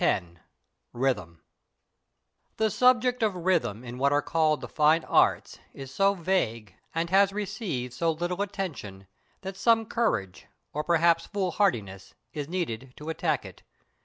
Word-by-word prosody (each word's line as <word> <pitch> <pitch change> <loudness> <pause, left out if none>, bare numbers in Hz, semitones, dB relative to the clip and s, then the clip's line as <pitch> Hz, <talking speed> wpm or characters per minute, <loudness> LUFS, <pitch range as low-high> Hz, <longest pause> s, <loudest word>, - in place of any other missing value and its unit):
X 95 - +2 0.7
RHYTHM 105 -11 -1 1.2
The 220 -1 +1
subject 250 +1 +3
of 215 -4 +1
Rhythm 170 - 0
in 125 0 -8
what 140 +1 +3
are 145 0 +2
called 155 -2 +1
the - - -6
Fine 155 +2 +3
Arts - - +2 0.2
is 135 -1 -9
so 195 0 +3
vague, 115 - -1 0.2
and 165 +1 -1
has 195 0 +5
received 195 - -4
so 165 +6 0
little 175 +4 -3
attention, 155 - -5 0.4
that 190 0 -6
some 225 +3 +3
courage, 100 - -1 0.3
or 150 - -2
perhaps 170 0 +3
foolhardiness, 170 - -1 0.2
is 145 -1 -5
needed 135 -8 -4
to 150 +2 -7
attack 160 - -1
it. - - -12
165 Hz, 140 wpm, -27 LUFS, 125-195 Hz, 1.2 s, has